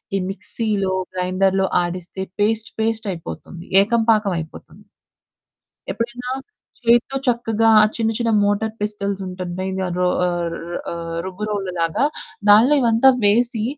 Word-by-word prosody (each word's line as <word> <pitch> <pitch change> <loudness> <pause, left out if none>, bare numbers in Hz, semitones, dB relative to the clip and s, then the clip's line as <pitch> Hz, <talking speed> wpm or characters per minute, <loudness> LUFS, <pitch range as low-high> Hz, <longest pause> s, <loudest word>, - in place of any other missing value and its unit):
ఈ - - +3
మిక్సీ‌లో 205 -1 -1 0.2
గ్రైండర్‌లో 185 +1 +1 0.2
ఆడిస్తే, 180 +2 -5 0.2
పేస్ట్ 215 +1 +1
పేస్ట్ 225 -1 -1
అయిపోతుంది. 170 0 -8 0.2
ఏకం 230 +3 +1
పాకం 210 -3 +2
అయిపోతుంది. 160 0 -11 1.1
ఎప్పుడైనా 245 +2 -4 0.5
చేత్తో 240 +3 +3
చక్కగా 225 -2 +2 0.3
చిన్న 225 -1 0
చిన్న 230 -2 0
మోటార్ 215 +2 0
పిస్టల్స్ 200 -2 -3
ఉంటాయి. 180 -1 -6
మెయిన్‌గా 190 0 -2
రో 180 - +2 0.2
ఆహ్ 175 -1 -1
రు - - -6 0.7
రుబ్బు 190 +2 -6
రోలు 195 -3 -2
లాగా. 165 - +1 0.4
దానిలో 230 +8 +7
ఇవంతా 235 +3 +5 0.2
వేసి 230 +2 +2
205 Hz, 120 wpm, -20 LUFS, 185-225 Hz, 1.1 s, దానిలో